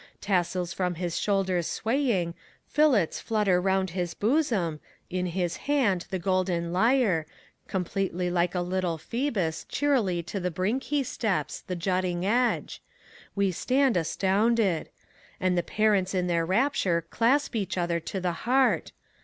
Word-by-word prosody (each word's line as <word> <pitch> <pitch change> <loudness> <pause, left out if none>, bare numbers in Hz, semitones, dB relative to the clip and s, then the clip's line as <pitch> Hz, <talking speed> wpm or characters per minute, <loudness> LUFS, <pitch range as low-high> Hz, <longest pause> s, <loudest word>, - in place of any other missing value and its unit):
Tassels 180 -2 0
from 180 -2 -1
his 175 0 -2
shoulders 190 -4 0
swaying, 225 -9 0 0.3
fillets 270 - +2
flutter 205 -5 +1
round 190 -1 +1
his 175 -1 -3
bosom, 215 - +1 0.3
In 180 0 -1
his 175 -1 -2
hand 235 -11 +1
the 190 - -2
golden 180 -2 0
lyre, 210 -6 +2 0.4
completely 180 -1 -2
like 175 0 +1
a 180 - +1
little 180 -2 -1
Phoebus, 205 - -2
Cheerily 225 -12 +1
to 195 +4 -4
the 180 0 -1
brink 190 +10 -1
he 285 +1 0
steps, 190 - -2
the 180 - -5
jutting 180 0 -1
edge: 240 +4 0 0.5
we 200 -1 +2
stand 260 - +2
astounded. 195 +2 +1 0.5
And 185 -1 +1
the 175 - +2
parents 200 -1 +1
in 180 -1 +1
their 170 -2 0
rapture 190 - +1
clasp 255 +4 +2
each 200 -4 -2
other 170 -1 0
to 190 +4 -5
the 180 -1 0 0.2
heart. 265 +1 +2
185 Hz, 140 wpm, -27 LUFS, 175-225 Hz, 0.5 s, fillets